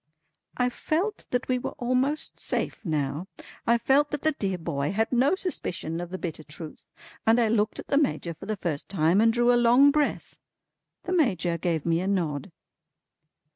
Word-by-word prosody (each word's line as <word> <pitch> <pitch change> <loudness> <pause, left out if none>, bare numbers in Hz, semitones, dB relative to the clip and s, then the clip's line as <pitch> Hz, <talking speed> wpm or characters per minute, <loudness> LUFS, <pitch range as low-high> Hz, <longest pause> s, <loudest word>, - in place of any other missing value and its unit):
I 250 0 +2
felt 350 - -2
that 250 0 -1
we 255 -1 +1
were - - -5
almost 255 +5 0
safe - - -2
now, 150 -1 -2 0.4
I 235 +1 +5
felt 270 +5 +3
that 295 -2 -4
the 315 - +3
dear 195 -10 -2
boy 145 -4 -2
had 220 +2 0
no 260 +7 +3
suspicion 175 - -3
of 175 - -6
the 185 - -5
bitter 165 -4 -5
truth, 155 +1 -9 0.4
and 225 +2 +4
I 230 -2 +3
looked 215 -1 +1
at - - -8
the 280 - +4
Major 220 - -1
for 160 - -11
the 215 -1 -2
first 165 -6 -4
time 175 +1 +3
and 225 0 +5
drew 240 +1 +3
a 240 - +3
long 255 +5 +6
breath. 295 0 -1 0.7
The 360 - -3
Major 185 - +1
gave 165 -3 -1
me 165 0 +2
a 185 - -2
nod. 175 -3 -1
220 Hz, 185 wpm, -26 LUFS, 170-260 Hz, 0.7 s, long